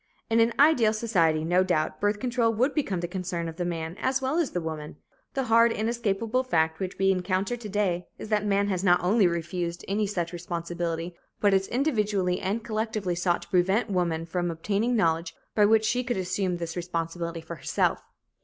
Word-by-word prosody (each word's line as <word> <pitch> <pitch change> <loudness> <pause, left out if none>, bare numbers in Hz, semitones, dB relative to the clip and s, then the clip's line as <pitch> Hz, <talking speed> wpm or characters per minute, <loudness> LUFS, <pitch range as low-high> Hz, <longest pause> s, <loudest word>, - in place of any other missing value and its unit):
In 225 - +4
an 230 +1 +4
ideal 275 -8 +5
society, 170 -9 +1
no 180 +2 +3
doubt, 155 -4 -1
birth 205 0 +1
control 240 -2 +1
would 255 +6 +2
become 200 - -1
the 175 - -2
concern 180 -2 -3
of 165 0 -7
the 180 - -1
man 165 -1 -3
as 260 +1 +1
well 270 +5 0
as 330 - +1
the 180 - -2
woman. 155 -3 -5 0.4
The 270 - +1
hard, 230 -1 +5
inescapable 230 +1 0
fact 160 -9 +1
which 185 -1 -4
we 195 0 +3
encounter 190 +4 0
to 235 -3 -8
day 190 -4 0
is - - -8
that 210 -1 +1
man 200 -1 +1
has 185 -2 -1
not 180 -2 +5
only 195 +2 +4
refused 170 0 -3
any 205 +1 0
such 175 -4 -3
responsibility, 170 0 -4 0.3
but 205 -1 +3
has 195 0 +2
individually 210 -9 0
and 205 +4 -2
collectively 215 -4 -2
sought 175 0 0
to - - -16
prevent 190 +5 +2
woman 170 -3 0
from 175 +1 -2
obtaining 200 +8 0
knowledge 165 -4 +1 0.2
by 210 -1 +4
which 220 0 +4
she 245 +3 +1
could 245 -4 -2
assume 185 0 -1
this 170 -1 -5
responsibility 170 -1 -3
for 165 +1 -8
herself. - - 0
190 Hz, 195 wpm, -27 LUFS, 170-220 Hz, 0.4 s, ideal